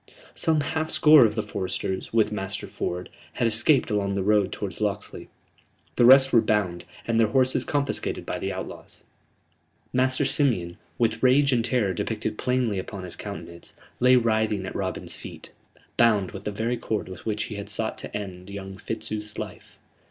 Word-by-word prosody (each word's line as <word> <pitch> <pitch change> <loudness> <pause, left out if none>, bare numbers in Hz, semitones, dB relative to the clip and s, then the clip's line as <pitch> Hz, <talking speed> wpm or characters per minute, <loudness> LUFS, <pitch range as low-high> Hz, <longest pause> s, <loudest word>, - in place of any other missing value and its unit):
Some 160 -2 +2
half 160 +2 -2
score 150 -4 +7
of 110 -1 0
the 110 - -1
foresters, 95 0 -3
with 110 -2 +2
Master 95 -1 -4
Ford, 90 +1 -4 0.3
had 120 - +1
escaped 115 +4 +3
along 100 -1 0
the 100 - -1
road 105 -1 +3
towards - - -5
Locksley: - - -3 0.7
the 120 - +4
rest 135 +1 +7
were 115 - +7
bound, 95 -6 0 0.2
and 115 -1 +1
their 115 - +5
horses 130 +3 +2
confiscated 145 -1 -2
by - - -3
the - - -2
outlaws. - - -8 0.9
Master 130 +2 +2
Simeon, 105 - +1 0.2
with 115 -3 0
rage 135 +2 +4
and 120 -2 +2
terror 115 -5 +1
depicted 110 +4 -3
plainly 125 -6 0
upon 95 0 -7
his 90 - -6
countenance, 85 0 -8 0.2
lay 125 +1 +6
writhing 110 -4 +1
at - - -6
Robin's - - -3
feet, - - -10 0.5
bound 105 -5 +3
with 100 0 -9
the 105 - -1
very 115 +4 -2
cord 110 -2 -3
with 95 +2 -9
which 105 0 -1
he 110 -1 -6
had 100 - -6
sought - - -1
to - - -5
end 95 -2 -8
young 95 -1 -7
Fitzooth's 110 -1 -5
life. - - -8
110 Hz, 175 wpm, -25 LUFS, 100-125 Hz, 0.9 s, score